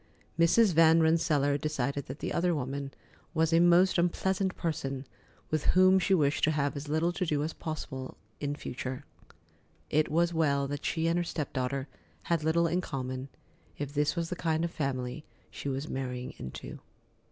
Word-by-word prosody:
Mrs. 180 +4 +5
Van 165 0 +6
Rensselaer 155 -3 +2
decided 140 -2 -2
that 130 - -6
the - - -4
other 175 0 +1
woman 140 0 -3 0.4
was 160 0 +2
a 165 - +6
most 175 +1 +5
unpleasant 190 +2 0
person, 140 -5 -3 0.5
with 155 -1 0
whom 185 +1 +6
she 190 +2 +3
wished 145 -4 +1
to - - +2
have 145 -2 0
as 145 +1 -6
little 160 +3 +1
to 185 - -2
do 150 -4 0
as 155 +1 -3
possible 135 -4 -6 0.2
in 145 0 -2
future. 130 -2 -5 0.9
It 155 +1 +2
was 170 +2 +2
well 140 -4 +2
that 145 0 -4
she 160 0 0
and 165 +1 +2
her - - +1
step 155 -4 -4
daughter 130 +1 -2 0.4
had 165 -3 0
little 165 +2 +3
in 175 +2 +1
common, 130 -4 -4 0.5
if 145 -1 -4
this 150 +2 +1
was 170 -1 -2
the - - -1
kind 165 -1 0
of 170 - -4
family 135 -2 -3 0.3
she 140 - -5
was 135 +2 -3
marrying 125 -1 -4
into. 65 - -7
155 Hz, 175 wpm, -30 LUFS, 140-170 Hz, 0.9 s, Van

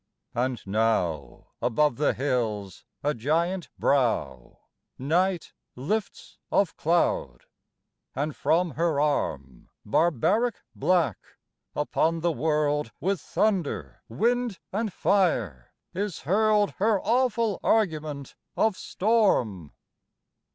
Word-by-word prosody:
And 125 0 -2
now 95 -8 -1
Above 135 +2 +2
the 150 - +1
hills 110 - -2 0.2
a 145 +1 +1
giant 165 +9 -1
brow 110 - 0 0.4
Night 175 +6 0 0.2
lifts 195 - -4
of 200 -4 +2
cloud; 150 - 0 0.7
and 145 +2 -2
from 175 +1 +1
her 160 0 0
arm, 70 - -2 0.2
Barbaric 175 - +2 0.2
black, 170 - +1 0.6
upon 160 +2 0
the 170 +1 +2
world, 150 0 0
With 195 0 -1
thunder, 145 - -1
wind 235 - 0 0.2
and 215 +1 -1
fire, 125 - 0 0.2
is 195 -1 -3
hurled 210 +4 +2
Her 210 0 +3
awful 230 -2 +1
argument 155 - 0 0.2
of 220 -3 +2
storm. 180 - +1
155 Hz, 95 wpm, -26 LUFS, 120-195 Hz, 0.7 s, Her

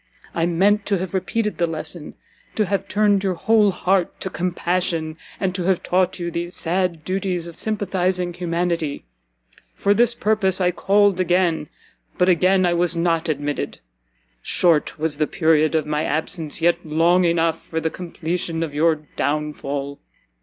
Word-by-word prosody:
I 165 0 +1
meant 200 +4 +2
to 200 - +2
have 185 0 -5
repeated 210 +2 -1
the 170 - +2
lesson, 160 0 -5 0.4
to 215 - +2
have 200 +1 -2
tuned 205 -1 +2
your 190 -2 0
whole 215 +3 +3
heart 185 0 0
to 190 - -4
compassion, 175 -2 -1 0.2
and 190 -2 0
to 185 - -3
have 185 -1 +1
taught 185 0 +1
you 170 -1 -4
the 170 +1 -3
sad 175 -1 -1
duties 185 -2 -2
of 170 -1 -9
sympathising 185 -4 -1
humanity. 170 - -2 0.7
For 200 - +2
this 235 +2 +3
purpose 210 -4 +1
I 180 -1 +2
called 200 +1 +3
again, 175 -4 +1 0.5
but 180 - +3
again 185 +2 +4
I 175 - +2
was 175 0 +1
not 165 -1 0
admitted! 145 -1 -2 0.6
Short 165 - +2
was 155 -1 -2
the 150 - +2
period 160 -4 +2
of 160 - +1
my 150 0 -1
absence, 160 +1 -3
yet 170 0 +3
long 165 +4 +3
enough 165 -1 +1
for 160 - -3
the 160 0 -2
completion 170 -1 -3
of 155 -3 -5
your 160 +2 +3 0.2
downfall!" 145 -1 -2
175 Hz, 160 wpm, -22 LUFS, 160-190 Hz, 0.7 s, again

